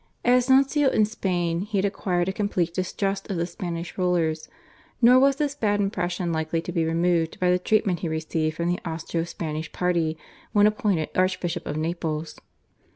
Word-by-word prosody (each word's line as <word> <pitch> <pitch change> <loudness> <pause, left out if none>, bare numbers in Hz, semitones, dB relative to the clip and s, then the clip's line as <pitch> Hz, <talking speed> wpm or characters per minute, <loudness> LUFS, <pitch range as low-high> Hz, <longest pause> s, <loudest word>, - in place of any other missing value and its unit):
As 250 +1 +4
nuncio 275 +2 +4
in 215 - +3
Spain 175 -5 -1
he 210 +1 -3
had 195 - +2
acquired 185 -3 -1
a 190 - -1
complete 185 -5 -1
distrust 195 +2 -2
of 195 - -2
the 170 - 0
Spanish 175 0 -6
rulers, 165 -3 0 0.5
nor 250 +2 +7
was 275 +1 +4
this 290 0 -1
bad 210 -7 0
impression 180 -3 -1
likely 160 0 -1
to 175 - -5
be 165 -2 0
removed 165 0 +1
by 180 -1 +3
the 180 - +2
treatment 195 -2 +1
he 170 - -3
received 160 0 -2
from 170 - -1
the 175 0 0
Austro 165 0 -3
Spanish 160 -2 -5
party 170 -3 0 0.4
when 205 -1 +5
appointed 210 -7 +1
Archbishop 180 -1 -1
of 150 - -3
Naples. 160 -1 -3
180 Hz, 175 wpm, -25 LUFS, 165-205 Hz, 0.5 s, nor